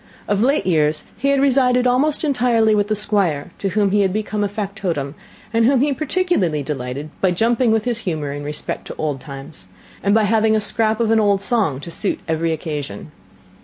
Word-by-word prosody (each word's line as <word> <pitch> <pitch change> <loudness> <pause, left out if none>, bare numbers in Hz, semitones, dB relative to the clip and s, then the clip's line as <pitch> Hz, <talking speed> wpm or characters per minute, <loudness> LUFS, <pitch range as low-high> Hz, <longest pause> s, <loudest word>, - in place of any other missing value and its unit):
Of 205 0 +1
late 275 +5 +2
years 155 -4 +2
he 275 - -2
had 280 0 +3
resided 255 -2 +3
almost 270 +6 +2
entirely 240 -6 +2
with 205 -1 +1
the 215 - 0
Squire, 190 -7 0
to 195 - -1
whom 200 0 +1
he 205 +1 +3
had 190 -2 +2
become 210 +1 -2
a - - +1
factotum, 195 -9 -3 0.4
and 230 0 +3
whom 255 +2 +4
he 285 0 +2
particularly 280 - 0
delighted 140 +1 -5
by 190 - +3
jumping 230 +6 +2
with 220 -1 +1
his 240 -2 -1
humour 155 -8 -3
in 145 0 -6
respect 150 +1 -4
to - - -7
old 150 -3 -2
times, 135 -10 -10 0.3
and 200 +1 +2
by 220 - +4
having 220 +1 +3
a - - +3
scrap 215 +1 +1
of 225 -1 +1
an 225 - +4
old 200 -2 +3
song 200 - 0
to 170 - -8
suit - - 0
every 165 0 0
occasion. 155 -2 -5
205 Hz, 200 wpm, -20 LUFS, 155-230 Hz, 0.4 s, whom